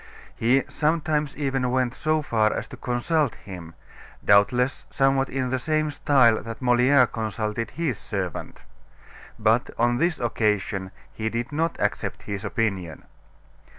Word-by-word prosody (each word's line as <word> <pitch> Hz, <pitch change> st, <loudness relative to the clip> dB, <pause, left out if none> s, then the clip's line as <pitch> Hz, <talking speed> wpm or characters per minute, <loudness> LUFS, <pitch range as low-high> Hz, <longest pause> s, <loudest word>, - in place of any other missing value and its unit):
He 125 Hz, +4 st, +3 dB
sometimes 150 Hz, -2 st, 0 dB
even 135 Hz, -3 st, 0 dB
went 125 Hz, -1 st, +1 dB
so 155 Hz, +2 st, 0 dB
far 110 Hz, -5 st, +2 dB
as -, -, -3 dB
to -, -, -8 dB
consult 125 Hz, +3 st, 0 dB
him, 85 Hz, -4 st, -10 dB, 0.5 s
doubtless 125 Hz, +6 st, +3 dB
somewhat 135 Hz, 0 st, +2 dB
in 130 Hz, -1 st, -2 dB
the 130 Hz, -, 0 dB
same 155 Hz, +2 st, 0 dB
style 125 Hz, -6 st, +4 dB
that 115 Hz, -1 st, -7 dB
Moliere 125 Hz, +2 st, +5 dB
consulted 110 Hz, 0 st, -3 dB
his 155 Hz, -9 st, -2 dB
servant. 95 Hz, -5 st, -5 dB, 0.7 s
But, 110 Hz, +3 st, +2 dB
on 120 Hz, +1 st, +2 dB
this 170 Hz, -1 st, +1 dB
occasion 105 Hz, -4 st, -1 dB, 0.2 s
he 110 Hz, 0 st, -2 dB
did 120 Hz, +3 st, -3 dB
not 165 Hz, +3 st, -1 dB
accept -, -, -2 dB
his 100 Hz, -1 st, -5 dB
opinion. 95 Hz, -7 st, -2 dB
120 Hz, 135 wpm, -25 LUFS, 110-140 Hz, 0.7 s, Moliere